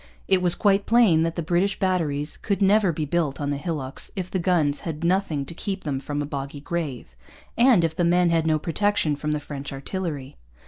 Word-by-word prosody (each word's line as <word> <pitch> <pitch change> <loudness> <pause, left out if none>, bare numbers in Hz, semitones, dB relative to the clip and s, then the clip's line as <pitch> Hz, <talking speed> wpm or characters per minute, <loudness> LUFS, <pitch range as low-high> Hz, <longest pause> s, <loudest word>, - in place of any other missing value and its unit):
It 190 -1 +3
was 175 -1 +3
quite 200 -1 +2
plain 225 -9 +5
that 165 0 0
the 170 - -2
British 180 +5 +1
batteries 155 -6 -1
could 200 -3 -2
never 200 -1 +4
be 155 -1 -3
built 150 -2 -1
on 145 -1 -1
the 145 - -1
hillocks 145 -3 -4
if 185 -2 -4
the 190 - 0
guns 165 -5 +1
had 160 -1 -5
nothing 170 -5 +1
to 150 - -8
keep 190 +3 -4
them 140 -3 -2
from 145 +1 -3
a - - -4
boggy 140 0 -5
grave, 145 - -4 0.4
and 235 -6 +5
if 160 -1 0
the 175 - 0
men 175 0 +3
had 165 -1 +2
no 155 -1 +3
protection 165 -1 0
from 150 +1 -4
the 150 - 0
French 145 -1 -7
artillery. 140 -1 -5
165 Hz, 215 wpm, -24 LUFS, 145-185 Hz, 0.4 s, plain